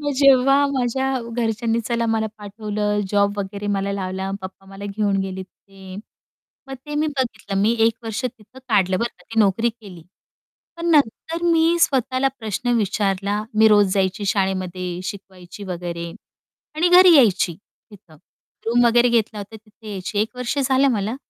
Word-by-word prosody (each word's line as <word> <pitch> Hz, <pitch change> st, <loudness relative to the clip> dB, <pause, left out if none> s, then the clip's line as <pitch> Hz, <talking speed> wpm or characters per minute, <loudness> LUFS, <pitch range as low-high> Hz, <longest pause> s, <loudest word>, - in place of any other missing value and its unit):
मग 290 Hz, -1 st, -2 dB
जेव्हा 275 Hz, 0 st, +5 dB
माझ्या 265 Hz, 0 st, -1 dB, 0.2 s
घरच्यांनी 230 Hz, 0 st, 0 dB
चला 230 Hz, +1 st, -1 dB
मला 220 Hz, -1 st, 0 dB
पाठवलं, 210 Hz, 0 st, -3 dB
जॉब 205 Hz, 0 st, +1 dB
वगैरे 200 Hz, +1 st, -5 dB
मला 195 Hz, 0 st, -2 dB
लावला, 190 Hz, 0 st, -4 dB
पप्पा 190 Hz, +1 st, -10 dB
मला 195 Hz, +1 st, -10 dB
घेऊन 205 Hz, 0 st, -1 dB
गेले 190 Hz, 0 st, -5 dB
तिथे 190 Hz, 0 st, -15 dB, 0.7 s
मग 270 Hz, -, -7 dB
ते 295 Hz, -, -5 dB
मी 305 Hz, +1 st, +1 dB
बघितलं. 240 Hz, -8 st, -3 dB
मग -, -, +2 dB
मी 220 Hz, +3 st, +3 dB
1 230 Hz, -, +1 dB
वर्ष 225 Hz, +3 st, -4 dB
तिथं 250 Hz, +1 st, -7 dB
काढलं 190 Hz, -4 st, +2 dB
बरं 235 Hz, +1 st, 0 dB
का, -, -, -19 dB
ती 225 Hz, -, 0 dB
नोकरी 210 Hz, +3 st, +2 dB
केली. 205 Hz, -7 st, -14 dB, 0.7 s
पण 335 Hz, -, -4 dB
नंतर 320 Hz, +4 st, +1 dB
मी 330 Hz, +1 st, +3 dB
स्वतःला 265 Hz, -3 st, +2 dB
प्रश्न 220 Hz, +2 st, -3 dB
विचारला 200 Hz, 0 st, -1 dB, 0.2 s
मी 220 Hz, -, +7 dB
रोज 205 Hz, -3 st, +4 dB
जायची 195 Hz, +1 st, 0 dB
शाळेमध्ये, 185 Hz, -2 st, -2 dB
शिकवायची 190 Hz, 0 st, -9 dB
वगैरे 170 Hz, -2 st, -5 dB, 0.7 s
आणि 345 Hz, +3 st, +3 dB
घरी 360 Hz, 0 st, +8 dB
यायची 195 Hz, -8 st, +3 dB, 0.4 s
तिथं. 185 Hz, -6 st, -17 dB, 0.5 s
रूम 240 Hz, +1 st, +3 dB
वगैरे 240 Hz, +1 st, +4 dB
घेतला 225 Hz, -2 st, 0 dB
होता, 205 Hz, +2 st, -8 dB
तिथे 215 Hz, 0 st, -14 dB
यायची 205 Hz, +1 st, -4 dB
1 220 Hz, +4 st, -1 dB
वर्ष 250 Hz, +3 st, -3 dB
झालं 270 Hz, 0 st, +3 dB
मला. 215 Hz, +1 st, -2 dB
215 Hz, 160 wpm, -21 LUFS, 195-245 Hz, 0.7 s, घरी